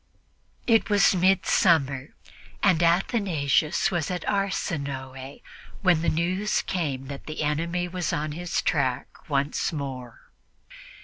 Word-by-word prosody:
It 225 Hz, -1 st, +3 dB
was 205 Hz, -1 st, +4 dB
midsummer, 170 Hz, -7 st, +2 dB, 0.5 s
and 185 Hz, -5 st, +4 dB
Athanasius 170 Hz, -, +1 dB
was 170 Hz, -4 st, -1 dB
at 180 Hz, -1 st, -4 dB
Arsinoe 140 Hz, -9 st, -3 dB, 0.4 s
when 180 Hz, -4 st, +4 dB
the 170 Hz, -, +1 dB
news 185 Hz, +6 st, 0 dB
came 145 Hz, -8 st, -3 dB
that 140 Hz, 0 st, -8 dB
the 155 Hz, 0 st, -4 dB
enemy 170 Hz, +4 st, -1 dB
was 175 Hz, -1 st, -3 dB
on 150 Hz, +1 st, -2 dB
his 175 Hz, +3 st, -2 dB
track 130 Hz, -3 st, -2 dB
once 140 Hz, 0 st, 0 dB
more. 130 Hz, -6 st, -7 dB
165 Hz, 115 wpm, -25 LUFS, 140-180 Hz, 0.5 s, was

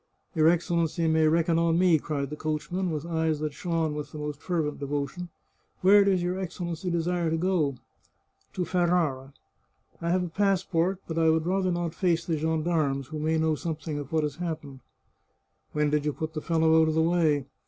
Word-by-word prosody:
" -, -, -42 dB
Your 155 Hz, -1 st, +4 dB
Excellency 170 Hz, -1 st, +1 dB
may 160 Hz, 0 st, +3 dB
reckon 165 Hz, +1 st, +2 dB
on 165 Hz, 0 st, +2 dB
me," 175 Hz, -3 st, +4 dB
cried 140 Hz, -2 st, -3 dB
the -, -, -3 dB
coach 150 Hz, 0 st, -3 dB
man, 185 Hz, 0 st, -1 dB
with 155 Hz, -1 st, -3 dB
eyes 160 Hz, -2 st, 0 dB
that 150 Hz, -1 st, -3 dB
shone 165 Hz, 0 st, -1 dB
with 150 Hz, 0 st, -6 dB
the -, -, -8 dB
most 150 Hz, -1 st, -5 dB
fervent 160 Hz, -5 st, -2 dB
devotion. 145 Hz, +5 st, -3 dB, 0.3 s
" -, -, -42 dB
Where 200 Hz, +2 st, +7 dB
does 190 Hz, -3 st, +2 dB
your 180 Hz, +2 st, -1 dB
Excellency 175 Hz, -1 st, -4 dB
desire 170 Hz, 0 st, 0 dB
to 165 Hz, -, 0 dB
gO? 165 Hz, -6 st, +1 dB, 0.3 s
" -, -, -39 dB
" -, -, -42 dB
To 180 Hz, -, -2 dB
Ferrara. 170 Hz, -7 st, 0 dB, 0.7 s
I 170 Hz, -, -1 dB
have 180 Hz, +1 st, +2 dB
a -, -, -2 dB
passport, 185 Hz, -1 st, +1 dB
but 165 Hz, 0 st, -2 dB
I 160 Hz, 0 st, +4 dB
would 160 Hz, 0 st, +2 dB
rather 185 Hz, +1 st, +1 dB
not 175 Hz, -2 st, -2 dB
face 170 Hz, -2 st, 0 dB
the 165 Hz, -, 0 dB
gendarmes, 155 Hz, -3 st, 0 dB
who 155 Hz, -1 st, -5 dB
may 160 Hz, +1 st, +1 dB
know 160 Hz, 0 st, +2 dB
something 155 Hz, -1 st, -4 dB
of 145 Hz, -1 st, -8 dB
what 160 Hz, -1 st, +1 dB
has 150 Hz, -1 st, -3 dB
happened." 155 Hz, -6 st, -5 dB, 0.5 s
" -, -, -47 dB
When 150 Hz, -1 st, +1 dB
did 150 Hz, -1 st, +1 dB
you 150 Hz, -1 st, -1 dB
put 160 Hz, +2 st, -5 dB
the 155 Hz, -, -4 dB
fellow 160 Hz, 0 st, +3 dB
out 160 Hz, -, +3 dB
of 155 Hz, -, 0 dB
the 160 Hz, -, +3 dB
way 160 Hz, -5 st, +2 dB
160 Hz, 215 wpm, -27 LUFS, 150-175 Hz, 0.7 s, Where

